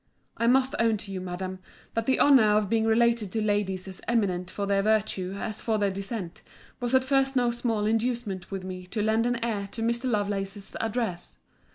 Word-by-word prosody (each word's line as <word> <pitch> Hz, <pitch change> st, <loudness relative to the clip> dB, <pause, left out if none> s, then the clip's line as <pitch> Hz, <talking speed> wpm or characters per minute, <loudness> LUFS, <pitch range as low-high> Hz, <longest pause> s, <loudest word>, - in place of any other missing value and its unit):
I 230 Hz, -, 0 dB
must 260 Hz, +2 st, +3 dB
own 225 Hz, -2 st, +3 dB
to 200 Hz, -1 st, -6 dB
you, 190 Hz, -1 st, -4 dB
Madam, 185 Hz, +1 st, -5 dB, 0.3 s
that 230 Hz, 0 st, -1 dB
the 265 Hz, -, +3 dB
honour 220 Hz, -7 st, +6 dB
of 210 Hz, -2 st, 0 dB
being 225 Hz, -1 st, +2 dB
related 230 Hz, -2 st, +2 dB
to 225 Hz, -, 0 dB
ladies 200 Hz, -3 st, 0 dB
as 190 Hz, -1 st, -7 dB
eminent 185 Hz, -6 st, 0 dB
for 200 Hz, +2 st, -3 dB
their 200 Hz, 0 st, +2 dB
virtue 200 Hz, -3 st, 0 dB
as 215 Hz, +1 st, -4 dB
for 220 Hz, -2 st, 0 dB
their 200 Hz, -2 st, +1 dB
descent, 195 Hz, -2 st, -5 dB, 0.4 s
was 245 Hz, +1 st, 0 dB
at 260 Hz, -, +5 dB
first 270 Hz, 0 st, +2 dB
no 245 Hz, -2 st, +3 dB
small 230 Hz, -3 st, -1 dB
inducement 225 Hz, -4 st, -1 dB
with 195 Hz, -2 st, -5 dB
me 185 Hz, -1 st, -7 dB
to 210 Hz, +3 st, -2 dB
lend 220 Hz, +2 st, +2 dB
an 245 Hz, 0 st, 0 dB
ear 205 Hz, -4 st, -2 dB
to 225 Hz, -, -3 dB
Mr. 235 Hz, +3 st, 0 dB
Lovelace's 200 Hz, -2 st, -2 dB
address. 225 Hz, -6 st, -2 dB
215 Hz, 200 wpm, -27 LUFS, 195-235 Hz, 0.4 s, honour